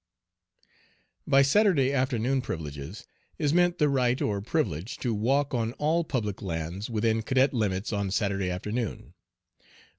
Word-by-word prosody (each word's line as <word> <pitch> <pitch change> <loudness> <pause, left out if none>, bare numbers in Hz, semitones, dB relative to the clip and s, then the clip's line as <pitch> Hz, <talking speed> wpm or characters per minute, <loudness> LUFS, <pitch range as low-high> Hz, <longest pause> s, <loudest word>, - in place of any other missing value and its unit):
By 135 0 +6
"Saturday 140 -4 +3
afternoon 130 0 +1
privileges" 80 - -6 0.3
is 150 -2 +1
meant 175 0 +3
the 150 - +3
right 125 -3 +1
or 100 -2 -1
privilege 105 - -2
to 120 -3 -1
walk 135 +7 +1
on 115 -1 -1
all 160 +5 +1
public 110 -10 -3
lands 85 +3 -4
within 110 0 +1
cadet 130 +4 +2
limits 105 -3 -1
on 100 -1 -1
Saturday 100 -1 0
afternoon. 105 +6 -4
115 Hz, 130 wpm, -27 LUFS, 100-135 Hz, 0.3 s, By